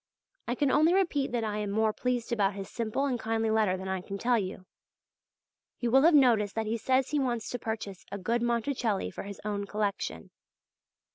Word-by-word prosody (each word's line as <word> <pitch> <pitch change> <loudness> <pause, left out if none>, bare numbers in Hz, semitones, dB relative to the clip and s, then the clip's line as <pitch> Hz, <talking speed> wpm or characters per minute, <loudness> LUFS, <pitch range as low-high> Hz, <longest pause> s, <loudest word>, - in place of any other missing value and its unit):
I 240 - 0
can 280 0 +2
only 315 +4 +4
repeat 310 -9 +1
that 240 -2 -1
I 210 -1 -2
am 210 -1 -2
more 215 +1 +1
pleased 245 -1 -2
about 200 -3 +1
his 195 -1 -6
simple 230 +4 -1
and 255 -4 -1
kindly 225 0 0
letter 215 -4 +2
than 190 +1 -6
I 190 -1 -2
can 195 +2 -6
tell 240 +3 +2
you. 185 -1 -5 1.1
You 240 -1 -1
will 265 +2 +6
have 325 +2 +6
noticed 230 -7 +4
that 225 0 -1
he 220 +2 -1
says 260 +3 +2
he 300 - +1
wants 240 -4 -1
to 245 - -3
purchase 215 -4 -5
a 200 - -3
good 230 +5 -1
Monticelli 235 -2 0
for - - -6
his 200 0 -8
own 205 -1 -2
collection. 200 - -3
225 Hz, 205 wpm, -29 LUFS, 205-250 Hz, 1.1 s, will